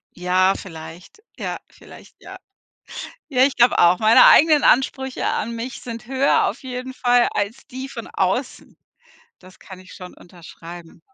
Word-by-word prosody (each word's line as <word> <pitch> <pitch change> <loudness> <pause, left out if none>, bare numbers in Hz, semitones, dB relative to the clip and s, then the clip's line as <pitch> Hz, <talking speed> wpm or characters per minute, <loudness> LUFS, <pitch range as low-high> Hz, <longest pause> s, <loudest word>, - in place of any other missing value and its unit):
Ja, 185 +2 +1
vielleicht, 175 - -12
ja, - - -5
vielleicht, - - -17
ja. - - -11 0.9
Ja, 255 -2 +3
ich 280 - -2
glaube 240 0 +3
auch. 175 +1 +5
Meine 220 +1 +6
eigenen 305 -1 +5
Ansprüche 265 0 +1
an 235 - -2
mich 235 +3 -7
sind 235 -1 -8
höher 265 +2 +1
auf - - -6
jeden 255 -1 -7
Fall 245 -1 +2
als 205 +6 -4
die 260 +1 -8
von - - -8
außen. - - -3 0.6
Das 185 0 -18
kann 190 -2 -12
ich 185 +1 -15
schon 180 -2 -11
unterschreiben. 170 -1 -14
230 Hz, 150 wpm, -20 LUFS, 180-260 Hz, 0.9 s, Meine